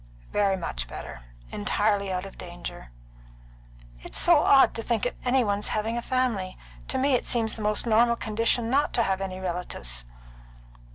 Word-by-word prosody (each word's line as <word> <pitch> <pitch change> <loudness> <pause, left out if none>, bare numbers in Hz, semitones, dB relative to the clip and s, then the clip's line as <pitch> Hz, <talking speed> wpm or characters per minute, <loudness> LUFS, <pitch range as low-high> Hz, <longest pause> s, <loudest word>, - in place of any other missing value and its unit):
"Very 200 -2 +2
much - - -4
better 60 - -8 0.3
entirely 200 - 0
out 185 +1 -2
of 195 - -10
danger." 175 - -8 1.1
"It's - - -3
so 345 -3 +6
odd 275 -2 +5
to 230 - -4
think 230 -1 -1
of 245 - -1
any 255 0 +3
one's 205 -1 -1
having 220 +2 -1
a 240 - -2
family. 235 -8 -1 0.3
To 265 - -2
me 270 +1 +2
it 250 - +1
seems 225 -2 +1
the 210 -1 0
normal 235 +1 +4
condition 230 +1 0
not 285 +2 +2
to 235 - +2
have 190 -1 -1
any 185 -1 -4
relatives." 170 - -3
210 Hz, 165 wpm, -26 LUFS, 185-235 Hz, 1.1 s, so